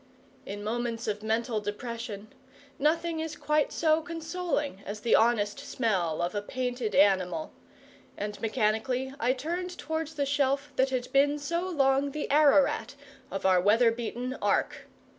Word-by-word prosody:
In 205 +1 -6
moments 230 +1 -2
of 210 -1 -2
mental 220 +1 0
depression, 215 0 -6 0.5
nothing 325 +3 +1
is 320 -1 -4
quite 300 -1 +1
so 315 -1 +2
consoling 330 - -3
as 210 +1 -6
the 235 - +1
honest 220 -1 +3
smell 195 - -1
of 175 - -1
a 205 - -1
painted 245 -2 -3
animal; 195 - +2 0.6
and 205 0 -5
mechanically 245 +4 0
I 250 0 +2
turned 350 +6 -4
towards 320 0 -4
the 285 -1 0
shelf 280 0 0
that 265 +1 +3
had 255 -2 -3
been 285 +2 +4
so 340 +5 -2
long 275 -3 +2
the 300 - -3
Ararat 280 -4 +4 0.3
of 195 - -5
our 185 -1 +5
weather 225 +5 +5
beaten 240 +2 -4
Ark. - - 0
250 Hz, 145 wpm, -28 LUFS, 215-295 Hz, 0.6 s, our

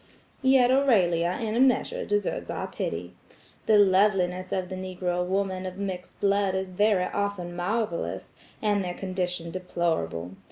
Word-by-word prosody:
Yet 260 -2 +5
Aurelia 185 -11 +3
in 220 -1 -2
a - - +1
measure 260 -2 +2
deserves 205 -1 -1
our - - -3
pity. 85 +2 -4 0.5
The 215 - +6
loveliness 185 -2 +3
of 185 -1 -2
Negro 185 -1 -2
women 190 0 -1
of 185 0 -7
mixed 190 -2 -5
blood 200 -1 +2
is 190 0 -3
very 200 -1 +2
often 200 -4 -3
marvellous, 175 - -2 0.3
and 205 -2 +2
their 180 -1 -4
condition 180 -3 -3
deplorable. 165 - -2
185 Hz, 135 wpm, -27 LUFS, 180-205 Hz, 0.5 s, The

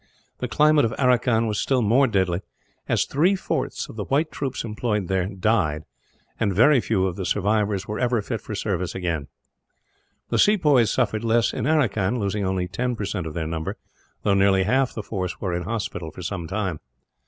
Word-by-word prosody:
The - - -2
climate 150 -1 +4
of 115 0 0
Aracan 125 -3 +3
was 105 -2 -1
still 130 -3 +1
more 125 +6 +4
deadly, 95 -5 0 0.5
as - - +2
three 175 +8 +2
fourths 190 - -3
of - - -11
the 105 - -3
white 150 +4 +1
troops 135 -2 -3
employed 105 -3 -2
there 95 -1 0
died, 95 -6 0 0.6
and 100 -4 0
very 125 +5 +5
few 95 -5 +1
of 90 -2 -3
the 95 - -3
survivors 105 +1 0
were 105 - -3
ever 120 -2 +1
fit 115 +1 -4
for 105 - -6
service 95 -4 -2
afterwards. 85 -6 -2 1.0
The - - +1
sepoys 150 - +4
suffered 110 -3 0
less 115 0 +2
in - - -2
Aracan, 120 -8 +1
losing 100 -1 -1
only 95 -1 -1
ten 125 +7 -2
percent 100 -5 -3
of 75 - -7
their 80 -2 -2
number, 80 0 -4 0.5
though 100 - +3
nearly 95 -1 +4
half 130 +6 +2
the 110 - -6
force 95 -4 -4
were 95 -3 -2
in 85 -1 -2
hospital 105 -6 -4
for 90 - -10
some 85 -2 -4
time. 95 -5 -2
105 Hz, 190 wpm, -24 LUFS, 95-120 Hz, 1.0 s, very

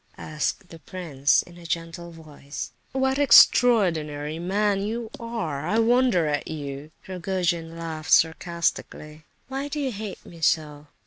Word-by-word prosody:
asked 155 +4 -3
the 165 - -12
prince 155 -7 0
in 175 0 -15
a - - -13
gentle 165 +1 -4
voice. 155 -3 -9 0.2
"What 265 0 0
an - - +4
extraordinary 165 - +4
man 195 +3 0
you 225 +2 -4
are! 170 -11 -4
I 215 - +1
wonder 235 -5 +3
at 150 -1 -1
you!" 145 -1 -6 0.2
Rogojin 175 -3 -2
laughed 160 -2 -6
sarcastically. 160 -2 0 0.2
"Why 270 +2 -4
do 295 +1 -4
you 270 -3 -1
hate 210 -2 -7
me 170 -1 -13
so?" 150 -1 0
170 Hz, 140 wpm, -25 LUFS, 155-215 Hz, 0.2 s, an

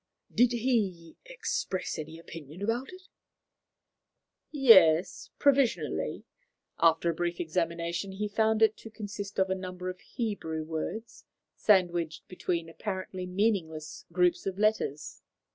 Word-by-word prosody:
"Did 245 0 +4
he 215 -9 0
express - - -3
any 160 +1 -7
opinion 165 +1 -9
about 235 - -1
it?" 370 0 -12 1.5
"Yes, 190 - +5
provisionally. 230 - +1 0.6
After 165 +1 +4
a - - -4
brief 175 +1 -2
examination, 170 +2 -2
he 210 +2 -2
found 220 +1 +2
it 220 -1 +5
to 225 - -10
consist 205 -2 -7
of 190 0 +2
a - - +4
number 185 -1 -5
of 185 0 -7
Hebrew 180 -10 -4
words 165 +8 -5 0.3
sandwiched 175 -5 +2
between 175 -2 -2
apparently 185 +1 -5
meaningless 180 -6 -1
groups 180 +1 +2
of 190 -1 -3
letters. 210 -8 0
185 Hz, 120 wpm, -29 LUFS, 165-215 Hz, 1.5 s, Yes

